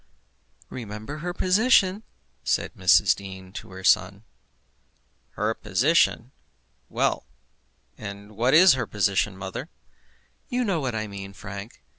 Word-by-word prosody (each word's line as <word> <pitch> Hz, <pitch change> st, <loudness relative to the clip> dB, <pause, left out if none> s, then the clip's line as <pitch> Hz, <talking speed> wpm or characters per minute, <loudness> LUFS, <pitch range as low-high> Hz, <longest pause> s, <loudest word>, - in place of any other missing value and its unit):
"Remember 110 Hz, +5 st, -7 dB
her 175 Hz, +3 st, -3 dB
position," 190 Hz, +1 st, +3 dB, 0.4 s
said -, -, -1 dB
Mrs. -, -, +5 dB
Dean 95 Hz, -1 st, -10 dB
to -, -, -8 dB
her 95 Hz, 0 st, -10 dB
son. 100 Hz, +3 st, +2 dB, 1.1 s
"Her -, -, -1 dB
position! -, -, +1 dB, 0.6 s
Well; -, -, -1 dB, 0.7 s
and 100 Hz, 0 st, -9 dB
what 125 Hz, +6 st, +3 dB
is 180 Hz, 0 st, +8 dB
her 130 Hz, -, -2 dB
position 100 Hz, -1 st, 0 dB
mother?" 95 Hz, -, -6 dB, 0.8 s
"You 250 Hz, -1 st, 0 dB
know 195 Hz, -7 st, 0 dB
what 130 Hz, -5 st, -3 dB
I 110 Hz, -1 st, -2 dB
mean, 100 Hz, -1 st, -8 dB
Frank. 100 Hz, +3 st, -9 dB
110 Hz, 120 wpm, -25 LUFS, 100-160 Hz, 1.1 s, is